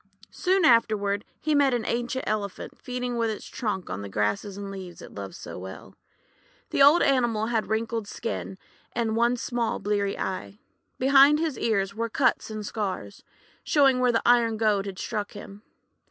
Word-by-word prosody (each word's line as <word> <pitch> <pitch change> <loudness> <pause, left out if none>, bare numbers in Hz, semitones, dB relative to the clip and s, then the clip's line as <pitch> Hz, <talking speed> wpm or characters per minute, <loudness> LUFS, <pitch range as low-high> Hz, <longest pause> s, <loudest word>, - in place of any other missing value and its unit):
Soon 375 -2 +2
afterward 210 -4 +3 0.2
he 310 0 0
met 280 -3 +4
an 235 - -2
ancient 245 +2 -2
Elephant 205 -3 -3
feeding 250 -1 -3
with 230 -1 +1
its 215 - -5
trunk 205 -6 -3
on 100 - -4
the 100 - -7
grasses 105 - -1
and 200 -1 -6
leaves 185 -3 -8
it - - -11
loves 100 -1 -7
so - - -8
well. 95 +1 -9 0.8
The - - +1
old 290 +5 +7
animal 240 -5 +2
had 225 -1 0
a - - -15
wrinkled 225 0 -2
skin, 205 -3 -5 0.4
and 225 -2 -1
one 235 +2 +2
small 235 -1 -1
bleary 200 0 -1
eye. 100 - -4 0.4
Behind 275 +3 +6
his 315 -3 -1
ears 200 -4 0
were 230 +2 -2
cuts 250 +1 +1
and 215 -1 -5
scars, 190 - -4 0.4
showing 275 -4 +4
where 250 -1 +3
the 230 - 0
iron 235 -2 +4
goad 210 -2 +1
had 190 -2 -6
struck 210 -1 -4
him. 205 0 -10
220 Hz, 175 wpm, -26 LUFS, 200-245 Hz, 0.8 s, old